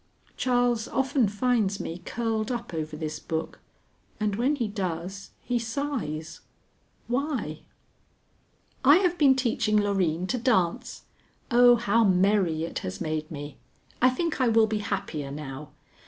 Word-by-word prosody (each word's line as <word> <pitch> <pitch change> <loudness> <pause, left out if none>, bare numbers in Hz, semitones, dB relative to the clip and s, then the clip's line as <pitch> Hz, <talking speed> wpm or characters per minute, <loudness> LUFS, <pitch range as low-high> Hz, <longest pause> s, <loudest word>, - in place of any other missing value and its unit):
Charles 245 -2 +1
often 265 -3 +1
finds 205 -2 0
me 170 +2 -5
curled 225 -1 -2
up 240 -5 -4
over 155 -1 -4
this 155 -1 -4
book, 160 0 -4 0.6
and 210 -2 0
when 255 +7 +1
he 240 -6 -1
does 190 -1 -4
he 245 -1 0
sighs. 225 - -4 0.7
Why? 245 - -2 1.2
I 285 +3 +8
have 360 -2 +1
been 275 -3 +6
teaching 230 -4 +1
Loreen 185 -5 +1
to 250 - 0
dance. 205 -9 0 0.5
Oh, 245 0 +7
how 230 0 +2
merry 185 -4 +2
it 165 - -3
has 95 0 -6
made 155 0 -3
me! 145 -2 -8 0.4
I 255 - +6
think 305 +2 -2
I 255 - +4
will 225 -1 +5
be 215 -1 -2
happier 170 -8 -3
now. 140 0 -7
210 Hz, 140 wpm, -27 LUFS, 165-245 Hz, 1.2 s, I